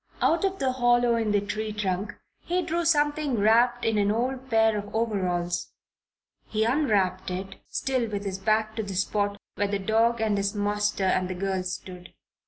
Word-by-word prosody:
Out 335 - +2
of 385 0 0
the 265 -5 0
hollow 240 -1 +3
in 225 -2 0
the 205 - +3
tree 215 +2 -3
trunk 205 0 -2 0.2
he 360 +1 -1
drew 340 +1 -1
something 295 -4 +2
wrapped 235 +3 +3
in 225 -2 +2
an 200 0 +2
old 255 +4 -2
pair 225 -2 +3
of 205 0 -5
overalls. 185 -6 -1 0.7
He 215 0 0
unwrapped 210 -9 +1
it, 190 +1 -5
still 255 -4 -1
with 205 -1 -4
his 195 -1 -3
back 215 +2 +1
to - - +1
the 200 -3 -5
spot 205 +2 0 0.2
where 205 - +1
the 200 0 -1
dog 225 +4 +2
and 215 -2 +1
his 200 +1 -1
master 205 0 0
and 185 -1 +1
the 185 - -3
girls 185 -1 -2
stood. 180 -1 -10
215 Hz, 185 wpm, -26 LUFS, 195-240 Hz, 0.7 s, hollow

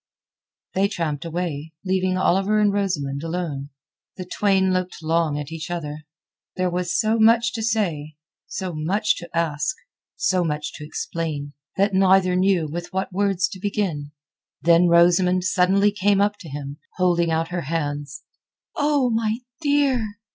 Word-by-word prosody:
They 195 +1 +2
tramped 165 -6 -3
away, 165 -2 -4
leaving 185 0 +1
Oliver 195 +3 +2
and 205 -1 +3
Rosamund 150 -9 -1
alone. 165 -4 -4 0.5
The 185 - -5
twain 190 0 +2
looked 185 -2 -3
long 160 -2 +1
each 155 +2 -6
at - - -2
the - - -1
other. 150 +1 -9 0.5
There 185 -1 0
was 175 0 -1
so 220 +1 +2
much 225 +1 +4
to 225 - -3
say, 175 -10 -1 0.3
so 185 -2 -4
much 185 +7 +1
to 170 - -8
ask, 150 -2 0 0.4
so 185 -1 +1
much 150 -2 -3
to 150 - -9
explain, 150 -2 -4 0.2
that 200 +1 +2
neither 190 -1 +4
knew 185 -3 +2
with 175 +3 -6
what 190 0 -3
words 195 -1 +1
to 190 - -9
begin. 180 -8 -2 0.5
Then 170 +1 +5
Rosamund 180 +2 +4
suddenly 190 +3 +3
came 205 0 +2
up 205 +1 +2
to 170 -5 -10
him, 140 0 -6 0.2
holding 175 -2 +2
out 165 0 0
her 175 -1 -2
hands. 145 -2 -3 0.5
"Oh, 290 -4 +2
my 225 -1 0 0.2
dear!" 275 -8 +1
180 Hz, 155 wpm, -23 LUFS, 160-200 Hz, 0.5 s, Then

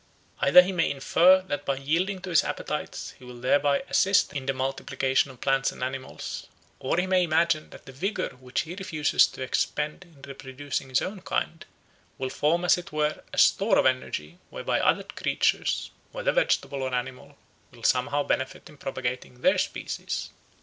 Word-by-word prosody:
Either 180 - +8
he 185 - -2
may 175 -3 +1
infer 175 +7 +4
that 145 -6 -4
by 140 - 0
yielding 170 +8 0
to 185 0 -7
his 165 - +5
appetites - - -4
he - - -16
will 125 -1 -10
thereby 140 - +2
assist 195 +1 +3
in 140 -2 -5
the - - +3
multiplication 130 0 0
of 130 -2 -13
plants 135 0 +1
and - - -7
animals; 130 +1 -5 0.3
or 130 - -1
he 180 - +2
may 185 -1 +3
imagine 165 -1 +1
that - - -14
the 135 - -10
vigour 190 +11 -2
which 125 0 -4
he 165 - -7
refuses 165 -6 +2
to 130 - -7
expend 150 +5 -1
in 165 -5 -21
reproducing 135 0 -5
his 130 - +1
own 195 0 -5
kind, 165 -2 -3 0.5
will 130 -1 -3
form 170 +4 +1
as 180 - +4
it 175 +2 -10
were 150 0 -1
a - - -8
store 200 +3 +4
of - - +3
energy 90 -11 -1
whereby - - -1
other - - +2
creatures, - - 0 0.2
whether - - 0
vegetable 140 -1 +1
or 130 -1 -1
animal, 130 +3 -5 0.3
will 120 -2 -17
somehow 145 +4 +2
benefit 130 -1 -2
in 150 - -16
propagating 125 -2 -5
their - - +4
species. - - -3
140 Hz, 175 wpm, -26 LUFS, 130-170 Hz, 0.5 s, Either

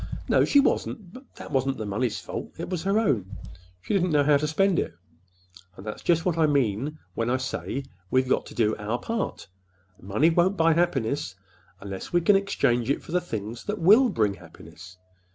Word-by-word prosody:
"No, - - +4
she 285 - +5
wasn't. 210 -8 -1
But 260 +1 -13
that - - -10
wasn't 135 -1 0
the 110 - -4
money's 105 +2 -1
fault. - - -7
It - - -6
was 180 -3 -2
her 195 +2 +2
own. 110 - 0 0.5
She - - -3
didn't 185 -2 +2
know 150 -3 +3
how 145 0 +4
to 150 +2 -1
spend 190 +4 +2
it. - - -3 0.8
And 95 - -11
that's 105 - -6
just 165 -2 +1
what 170 -3 0
I 155 - +4
mean 140 +1 0 0.2
when 115 +4 -1
I 130 - +2
say 130 +1 -4 0.3
we've 130 +3 +2
got - - 0
to - - -12
do 110 -2 +2
our 110 +3 -2
part—money 95 - -3
won't 180 +4 +2
buy 165 0 +4
happiness, 140 - 0 0.4
unless 100 -1 -7
we 175 - +3
exchange 170 - +2
it 140 - 0
for - - -11
the 180 +1 +1
things 115 - -6
that 210 +1 -2
will 215 +9 +6
bring 105 - +1
happiness. 85 0 -14
135 Hz, 190 wpm, -26 LUFS, 105-175 Hz, 0.8 s, will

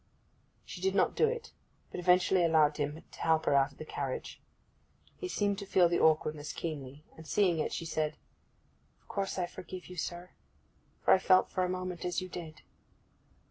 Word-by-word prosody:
She 180 - -8
did 190 +1 +1
not - - +3
do 460 - +4
it, 470 0 -4 0.4
but - - -5
eventually 180 +1 +4
allowed 155 -3 +4
him 150 +2 -3
to - - -14
help 160 -1 +2
her - - +3
out 140 0 +4
of - - -23
the 155 - -7
carriage. 135 -3 -5 0.7
He 375 - -5
seemed 205 - 0
to 200 - -6
feel 180 -2 +5
the 170 - +1
awkwardness 155 -1 +2
keenly; 145 -3 -6
and 160 0 -12
seeing 180 -4 +2
it, - - -1
she 165 - -4
said, 155 -1 -1 0.8
'Of - - -35
course 195 -1 -3
I 180 - +1
forgive 180 +1 -9
you, 180 - -10
sir, 175 +2 -4 0.7
for - - +7
I - - +5
felt 185 0 +4
for 185 - 0
a 180 - 0
moment 185 -1 -4
as 180 0 -1
you 185 0 -6
did. 160 -3 -8
175 Hz, 190 wpm, -31 LUFS, 155-185 Hz, 0.8 s, for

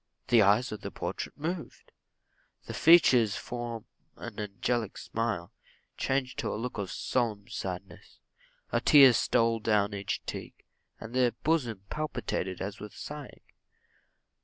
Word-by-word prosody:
The 120 -3 +6
eyes 105 +6 +4
of 105 -1 -6
the - - -5
portrait - - -5
moved; 165 +3 -5 0.7
the - - -6
features 130 - +6
from 120 -2 -5 0.3
an - - -8
angelic 105 +2 -2
smile, 110 -7 -3 0.4
changed 135 -1 -1
to - - -1
a - - -3
look 120 +1 -4
of 100 -2 -3
solemn 110 -5 -1
sadness; 95 -6 -7 0.5
a - - +1
tear 135 -4 +8
stole 115 0 +2
down 105 -2 +1
each 100 -1 -3
cheek, - - -7 0.3
and 115 +1 -9
the 125 -2 +2
bosom 125 -11 0
palpitated 125 -11 -3
as 100 +2 -4
with 105 - -9
sighing. 150 -2 -8
115 Hz, 135 wpm, -29 LUFS, 105-130 Hz, 0.7 s, tear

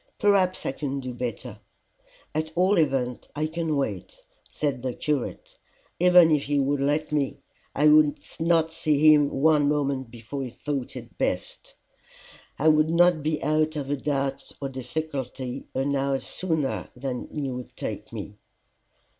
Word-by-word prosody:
"Perhaps 195 -3 +2
I - - 0
can 140 0 -3
do 130 -2 -5
better. 120 -2 -5 0.7
And 155 +1 0
at 160 - -13
all 185 +2 +3
events 130 -5 0
I 150 +1 0
can 160 -1 -1
wait," 105 -10 -3 0.3
said 140 -4 -2
the 130 -1 -3
curate. 150 -4 -3 0.4
"Even 180 -2 +7
if 150 -2 +2
he 145 0 0
would 140 +1 +1
let 150 +2 0
me, 145 -3 0 0.4
I 150 +2 +4
would 150 -1 +6 0.2
not 165 -1 +2
see 155 -1 +5
him 145 -1 +4
one 145 0 +3
moment 140 -4 -1
before 120 +4 -7
he 130 - -4
thought 135 +2 -4
it - - -10
best. - - -3 0.8
I 155 - +1
would 155 0 +5
not 170 -1 +4
be 155 +1 -1
out 155 +2 +1
of 140 -2 -3
a - - +2
doubt 135 -1 -2
or 140 - -3
difficulty 130 -1 -5
an 140 +2 0
hour 135 0 +1
sooner 160 -1 -2
than 125 -1 -4
he 140 -3 -3
would 125 0 -8
take - - -5
me." - - -7
145 Hz, 160 wpm, -26 LUFS, 135-155 Hz, 0.8 s, Even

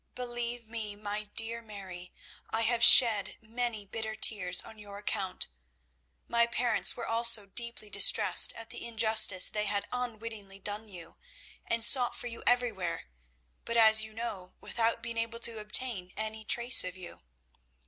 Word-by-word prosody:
Believe 240 -1 -6
me, 220 -2 -7
my 210 0 -7
dear 225 +2 -2
Mary, 190 -5 -12 0.4
I 225 - -3
have 230 +1 -1
shed 225 -5 +7
many 225 -1 -6
bitter 220 +2 -7
tears 180 -5 0
on 220 - -15
your 200 -1 -12
account. 195 -2 -3 0.8
My 235 0 0
parents 240 -1 +1
were 235 - -6
also 230 -2 +3
deeply 225 +1 -5
distressed 200 0 +5
at 230 0 -11
the 240 - -9
injustice 220 -4 +4
they 210 0 -3
had 200 0 -4
unwittingly 225 -5 -7
done 205 +3 -6
you, 175 -4 -13 0.5
and 230 0 +2
sought 245 -1 +5
for - - -9
you 230 -1 -9
everywhere; 200 - -2 0.5
but, 235 - -4
as 220 -1 +5
you 220 - -9
know, 210 -5 -9
without 230 0 -3
being 230 0 -6
able 230 0 -5
to 230 -2 -3
obtain 210 -3 -3
any 220 0 -6
trace 240 +3 +4
of 185 0 -8
you. 180 -1 -12
220 Hz, 155 wpm, -28 LUFS, 205-235 Hz, 0.8 s, shed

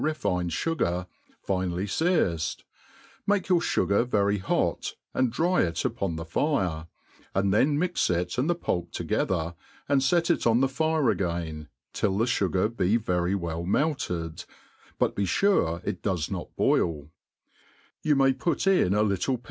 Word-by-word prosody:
refined 100 - -1
fugar, 90 - -1 0.4
finely 95 -1 -1
fearced; 100 - 0 0.6
make 200 -2 +1
your 180 -2 +5
fugar 100 -9 +1
very 100 -4 +1
hot, 95 - -1 0.2
and 130 -2 +1
dry 175 +8 +2
it 85 -1 -1
upon 100 -7 -1
the 80 0 -5
fire, 85 - -1 0.5
and 95 0 +2
then 145 +7 +3
mix 180 +3 +1
ic 90 0 -1
and 130 +6 0
the 175 - +2
pulp 85 - -2
together 85 -2 -1 0.3
and 140 -2 +2
fet 170 +5 +3
it 170 - +1
on 115 +1 +4
the 135 - +3
fire 155 -1 +1
again, 85 -5 -3 0.3
till 95 -2 0
the 115 - +2
fugar 95 -4 +1
be 110 -2 +1
very 90 -4 0
well 85 -3 -3
melted 90 - -1 0.5
but - - +1
be 100 - 0
fure 90 - +2
it 90 - -3
does 90 -6 -1
not - - -4
boil: 75 -3 +1 0.9
you 150 -1 +2
may 135 -1 +4
put 150 +6 -1
in 180 - +3
a 105 - +3
little 105 +6 0
p? - - -21
100 Hz, 155 wpm, -27 LUFS, 85-140 Hz, 0.9 s, your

